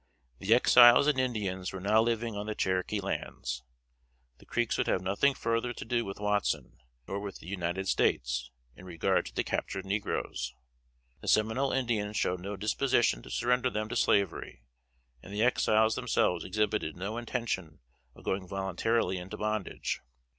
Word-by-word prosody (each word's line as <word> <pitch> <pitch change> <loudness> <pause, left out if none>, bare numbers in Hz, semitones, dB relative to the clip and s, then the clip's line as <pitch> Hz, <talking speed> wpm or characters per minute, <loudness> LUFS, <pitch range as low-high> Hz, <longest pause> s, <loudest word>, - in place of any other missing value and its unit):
The 110 +4 +4
Exiles 120 +1 +8
and 145 -3 +2
Indians 100 -7 -2
were 95 - -6
now 105 +4 +3
living 115 -1 -1
on 105 +1 -4
the 110 - -3
Cherokee 95 +2 0
lands. 65 -9 -4 0.8
The - - -19
Creeks 120 -1 0
would - - +1
have 95 - +1
nothing 100 +9 +2
further 115 +1 -1
to - - -8
do 120 +1 0
with 100 - -6
Watson, 105 0 -1 0.3
nor 100 - -3
with 100 -1 -6
the - - -15
United 90 0 -3
States, - - +1 0.3
in 90 - -13
regard 85 -3 0
to - - -10
the - - +1
captured 95 - -3
negroes. 95 - -2 0.6
The - - -11
Seminole 110 +6 +2
Indians 110 -5 -1
showed 90 0 0
no 100 +3 -5
disposition 110 - +2
to - - -12
surrender 125 +1 +1
them 110 -2 -3
to - - -4
slavery, 100 -10 +1 0.6
and 95 - -12
the 105 +2 0
Exiles 110 -2 +3
themselves 90 -2 +1
exhibited 105 -4 -1
no 100 +5 -4
intention 115 -9 -3 0.4
of - - -15
going 95 -1 -2
voluntarily 95 +2 0
into 95 +4 -7
bondage. 105 -2 -2
105 Hz, 160 wpm, -30 LUFS, 95-115 Hz, 0.8 s, Exiles